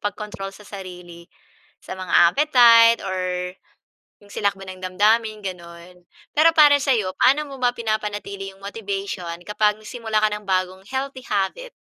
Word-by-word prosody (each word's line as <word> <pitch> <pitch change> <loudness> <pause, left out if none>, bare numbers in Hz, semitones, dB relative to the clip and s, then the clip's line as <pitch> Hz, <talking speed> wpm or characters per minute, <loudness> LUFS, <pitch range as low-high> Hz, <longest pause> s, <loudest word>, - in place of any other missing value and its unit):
pagkontrol 205 -1 -5
sa 210 - -15
sarili 180 -4 -10 0.5
sa - - -9
mga 185 -1 -7 0.2
appetite 235 -5 +6
or 180 -1 -3 0.7
yung 205 - -19
silakbo 200 -1 -2
ng 185 -1 -10
damdamin, 215 +3 +1
gano'n. 175 -1 -9 0.4
Pero 320 +2 +6
para 295 -2 +7
sa'yo, 230 -9 0
paano 295 +3 +4
mo 275 - -9
ba 245 -1 +1
pinapanatili 210 -3 -4
yung 195 - -23
motivation 195 -4 -5
kapag 210 +1 +1
nagsimula 220 0 -5
ka 215 - +3
ng 210 0 -5
bagong 185 0 -1
healthy 265 0 -4
habit? 470 - -2
205 Hz, 140 wpm, -22 LUFS, 185-230 Hz, 0.7 s, para